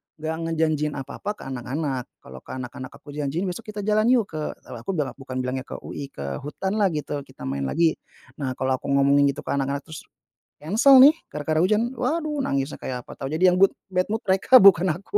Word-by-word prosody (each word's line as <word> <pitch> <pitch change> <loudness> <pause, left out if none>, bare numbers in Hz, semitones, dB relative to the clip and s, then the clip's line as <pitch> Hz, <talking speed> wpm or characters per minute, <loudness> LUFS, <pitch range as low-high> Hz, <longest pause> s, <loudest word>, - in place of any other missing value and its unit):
gak 160 +1 -4
ngejanjiin 155 -2 0
apa-apa 135 +9 -5
ke - - -15
anak-anak. 130 +1 -3 0.2
Kalau 65 0 -11
ke - - -13
anak-anak 130 0 -7
aku - - -15
janjiin, 150 +4 -2
besok 220 +6 -7
kita 205 - -4
jalan 215 +1 +2
yuk 235 -5 +2
ke 155 - -6 0.3
kalau 125 - -9
aku 120 - -4
bela 150 -5 -1
bukan 130 -1 -5
bilangnya 130 +1 -3
ke - - -8
UI, 140 - -6
ke 70 -1 -5
hutanlah 195 +8 -1
gitu, 150 -1 -3
kita 130 - -18
main 70 0 -2
lagi. 165 - +2 0.4
Nah 135 -3 -2
kalau 130 0 0
aku - - -10
ngomongin 140 +1 +4
gitu 140 - -8
ke - - -9
anak-anak, 140 0 -1
terus 160 -1 -10 0.6
cancel 240 - +6
nih 290 +3 +9 0.2
gara-gara 150 +1 -1
hujan, 215 +7 +2
waduh, 300 +4 -1
nangis 135 0 -1
kayak 125 -1 -4
apa - - -12
tahu, 135 - -3
jadi 180 +3 +4
yang 180 - +1
good 195 - +5 0.2
bad 185 0 +1
mood 220 +1 -2
mereka, 195 +6 +5
bukan 185 -3 +6
aku. 200 - -3
155 Hz, 210 wpm, -24 LUFS, 135-195 Hz, 0.6 s, nih